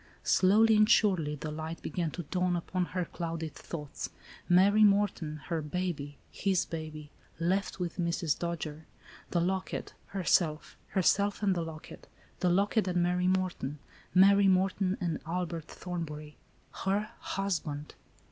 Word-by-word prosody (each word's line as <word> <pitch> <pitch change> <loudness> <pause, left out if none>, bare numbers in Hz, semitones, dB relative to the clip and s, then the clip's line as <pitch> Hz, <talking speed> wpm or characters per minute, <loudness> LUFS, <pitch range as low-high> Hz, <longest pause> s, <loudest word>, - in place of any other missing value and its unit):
Slowly 215 +4 +5
and 215 +1 +5
surely 180 -10 +3
the 150 +1 -5
light 160 +2 -5
began 165 +1 -2
to 175 - -4
dawn 180 +3 0
upon 180 +1 -1
her 180 0 -2
clouded 165 -3 -4
thoughts. 150 -4 -6 0.4
Mary 200 +4 +6
Morton; 200 -7 +2
her 165 -2 -1
baby, 150 -3 -3
his 190 -3 +1
baby; 155 -2 -7 0.3
left 190 +4 0
with 175 -2 -3
Mrs. 170 -3 0
Dojere; 160 -2 -4 0.4
the 175 - +1
locket'; 185 0 -2
herself; 170 -4 +1
herself 200 +2 +2
and 195 -2 +4
the 175 - -1
locket; 160 -1 -9 0.3
the 180 - +2
locket 200 +3 +2
and 180 -1 +2
Mary 180 +1 +1
Morton; 185 -6 -1 0.3
Mary 200 +2 +6
Morton 190 0 +2
and 170 -4 -1
Albert 170 -2 -3
Thorn 175 -1 -5
bury; 150 -1 -8 0.5
her 205 +3 0
husband! 165 -7 -3
175 Hz, 140 wpm, -30 LUFS, 160-190 Hz, 0.5 s, Mary